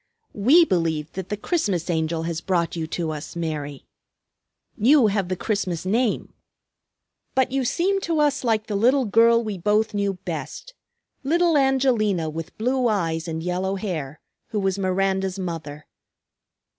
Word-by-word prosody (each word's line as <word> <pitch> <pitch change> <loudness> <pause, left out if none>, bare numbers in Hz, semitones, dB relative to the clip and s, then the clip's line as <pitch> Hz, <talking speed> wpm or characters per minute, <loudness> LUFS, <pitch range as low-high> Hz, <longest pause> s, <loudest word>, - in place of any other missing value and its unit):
"We 275 - +5
believe 165 - -1
that 190 -1 -6
the 210 - -2
Christmas 205 - -1
Angel 160 -1 -1
has 165 -1 -3
brought 175 -3 0
you 160 -2 -3
to 165 -1 -3
us, 155 +2 -7
Mary. 150 -4 -4 0.9
You 265 +3 +5
have 200 -3 0
the 185 - 0
Christmas 185 -4 -2
name. 225 +4 0 1.0
But 260 -1 +2
you 270 0 0
seem 370 +10 +1
to 330 -4 -1
us 295 -3 +2
like 220 -3 +1
the 210 - -3
little 250 +6 +3
girl 230 +2 +4
we 210 -4 -4
both 210 +4 +1
knew 200 -1 0
best, 170 - -7 0.5
little 335 +3 +2
Angelina 245 - +2
with 165 +1 -7
blue 250 +2 +1
eyes 165 -6 -1
and 160 0 -4
yellow 185 +2 -1
hair, 160 -7 -4 0.3
who 215 - -2
was 195 0 0
Miranda's 190 0 0
mother. 160 -5 -6
195 Hz, 150 wpm, -23 LUFS, 165-235 Hz, 1.0 s, We